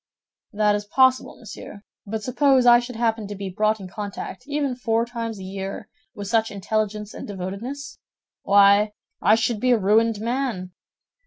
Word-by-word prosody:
"That 210 -1 +2
is 205 0 -2
possible, 260 +4 +2
monsieur; 210 -2 -10 0.2
but 215 +1 -4
suppose 260 +1 +3
I 240 0 +8
should 245 0 -7
happen 225 -2 0
to 205 - -6
be 195 -1 -5
brought 215 +3 +1
in 190 - -8
contact, 205 +4 -7
even 285 -3 -1
four 230 -2 0
times 230 -2 -5
a 190 - -8
year, 195 +1 -6 0.3
with 205 -1 -6
such 225 +1 +2
intelligence 210 +1 -2
and - - -8
devotedness—why, 205 -1 0 0.3
I 210 +4 +5
should 225 -1 0
be 255 - +1
a 245 - +5
ruined 215 +2 +2
man!" 230 -5 -2
220 Hz, 160 wpm, -23 LUFS, 200-240 Hz, 0.3 s, I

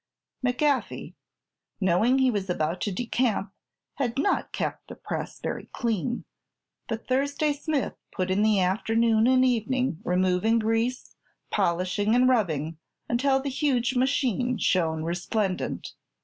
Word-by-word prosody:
McGaffey, 265 +3 0 0.7
knowing 205 +7 +3
he 260 -1 +4
was 200 -3 -3
about 170 0 -1
to 205 - -1
decamp, 225 -1 -1 0.5
had 245 -3 -1
not 345 +8 +1
kept - - -3
the - - -9
press - - -5
very - - -4
clean; 235 +1 -2 0.6
but 225 0 -5
Thursday 285 +3 +1
Smith 290 -1 -2 0.2
put 185 0 -2
in 195 +2 +2
the 215 -2 +4
afternoon 220 +4 +2
and 260 0 +5
evening 250 - 0
removing 185 +5 +2
grease, 225 +3 -1 0.4
polishing 185 +5 +1
and 250 +1 +5
rubbing, 165 - 0 0.3
until 265 +3 +2
the 280 +1 -3
huge 260 -3 +1
machine 250 -2 +1
shone 160 -5 +1
resplendent. 185 +3 -2
230 Hz, 125 wpm, -26 LUFS, 185-255 Hz, 0.7 s, and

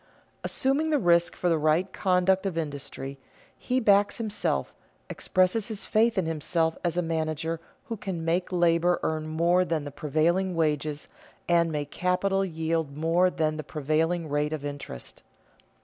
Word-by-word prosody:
_ - - -33 0.4
Assuming 280 +4 +1
the 305 - +3
risk 170 -5 +3
for 180 - -1
the 165 -2 +2
right 155 +5 +1
conduct 190 +1 +2
of 175 -4 -4
industry, 140 -3 -5 0.4
he 255 +1 -1
backs 205 -3 +3
himself, 215 -3 -1 0.4
expresses 185 +3 +1
his 220 -2 -1
faith 225 0 +2
in 185 - +2
himself 160 +1 0
as 175 -1 0
a 180 - +2
manager 160 0 -2 0.3
who 235 -4 -4
can 185 -5 -5
make 175 +3 0
labor 175 0 +3
earn 155 0 -1
more 170 +3 +2
than 165 -4 -1
the 145 - -6
prevailing 170 +6 0
wages 150 -2 -1 0.4
and 170 -1 +3
make 145 -2 -3
capital 195 +2 +1
yield 160 -4 -2
more 165 +4 +3
than 155 -3 -1
the 155 - -4
prevailing 160 +4 -1
rate 150 +1 -1
of 150 -2 -4
interest. 140 - -7
165 Hz, 160 wpm, -27 LUFS, 155-185 Hz, 0.4 s, the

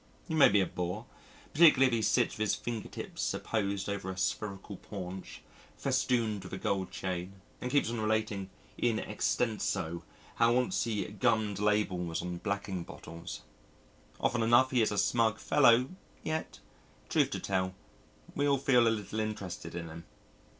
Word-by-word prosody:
He 165 - -4
may 155 -3 +7
be 100 0 +4
a - - +2
bore 90 +6 -4 0.5
particularly 150 -4 +7
if 130 - +2
he 115 - +2
sits - - +2
with - - -10
his - - +2
finger 115 -3 -4
tips - - -3
apposed 100 -3 -2
over 100 -2 -3
a 95 - -5
spherical 100 0 -3
paunch, 95 -2 -8 0.3
festooned 110 -5 0
with 90 - -9
a - - -2
gold 95 -1 -1
chain, 90 0 -4 0.3
and 125 - -2
keeps 140 -4 +2
on 120 -2 -2
relating 110 -3 -1 0.3
in 115 -2 +2
extenso 105 -6 -1 0.4
how 115 0 +4
once 125 +4 +1
he 110 -3 -1
gummed 105 -1 0
labels 95 -6 0
on 90 0 -4
blacking 100 -3 -3
bottles. 85 0 -9 0.8
Often 120 - +1
enough 120 +3 +5
he 125 -2 +3
is 110 - +2
a 105 - -2
smug 115 0 +2
fellow, 120 +2 +4 0.3
yet, 155 0 -3 0.5
truth - - +2
to - - -3
tell, 95 -1 -1 0.6
we 145 0 +1
all 140 -1 +4
feel 125 -3 +4
a - - +6
little 110 -1 -2
interested 105 -6 -4
in 85 -1 -4
him. 80 +1 -9
105 Hz, 165 wpm, -31 LUFS, 95-115 Hz, 0.8 s, may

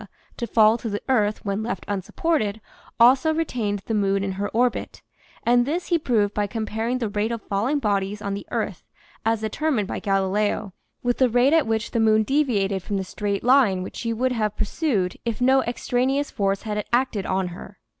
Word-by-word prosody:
to 235 - -4
fall 220 +1 +4
to 230 - -4
the 205 0 -4
earth 215 -5 +1
when 200 +1 -1
left 220 -4 -4
unsupported, 210 - -1 0.4
also 260 +6 +6
retained 220 -11 -2
the 225 - -2
moon 195 -2 +1
in 195 - -2
her 200 +2 -3
orbit; 245 +2 -1 0.4
and 245 +1 +4
this 320 +8 -3
he 340 -2 +3
proved 215 -8 +1
by 205 -1 0
comparing 225 +3 -2
the 235 -3 -2
rate 210 +2 -1
of 230 - -2
falling 225 +9 0
bodies 205 -4 -1
on 200 -1 -3
the 200 - -6
earth, - - -3 0.4
as 225 -1 +1
determined 220 0 -1
by - - -4
Galileo, 200 0 0 0.3
with 245 0 0
the 260 -2 +4
rate 245 +5 +3
at 320 -7 +3
which 220 -1 -1
the 230 - 0
moon 220 -1 +4
deviated 210 -8 +1
from 200 +3 -3
the 190 - -1
straight 200 +1 -3
line 240 -8 +4
which - - -8
she 230 - -2
would 255 +3 0
have 215 -4 -1
pursued 215 - -1
if 230 -2 -3
no 265 +2 +4
extraneous 255 +4 0
force 195 -2 -1
had 210 -1 -2
acted 240 -5 +1
on 190 -1 0
her. 175 - -11
220 Hz, 195 wpm, -24 LUFS, 200-245 Hz, 0.4 s, also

